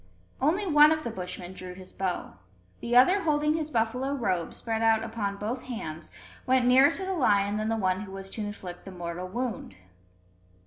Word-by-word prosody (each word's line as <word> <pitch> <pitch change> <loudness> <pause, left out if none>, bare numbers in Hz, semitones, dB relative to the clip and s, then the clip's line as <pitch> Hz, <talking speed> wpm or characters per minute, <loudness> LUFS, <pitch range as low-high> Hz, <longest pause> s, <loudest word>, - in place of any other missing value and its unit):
Only 340 +9 +2
one 300 -3 +7
of 315 -1 0
the 235 - -3
Bushmen 180 -2 -6
drew 185 -1 -8
his 185 0 -10
bow. 185 - -3 0.4
The 240 +1 -2
other 365 +11 +6
holding 300 -2 +2
his 310 -1 -2
buffalo 250 +2 0
robe 185 -10 -1
spread 225 -1 -3
out 225 -1 +3
upon 215 -3 -3
both 230 +5 -4
hands, 160 -11 -6 0.4
went 255 -1 +3
nearer 260 +3 +7
to 380 +4 -3
the 380 - -2
lion 205 - +2
than 215 +1 -1
the 225 - 0
one 185 -2 0
who 200 -2 -8
was 195 0 -7
to 220 - -5
inflict 190 -4 -7
the - - -9
mortal 175 0 -5
wound. 235 - -4
225 Hz, 190 wpm, -28 LUFS, 190-265 Hz, 0.4 s, one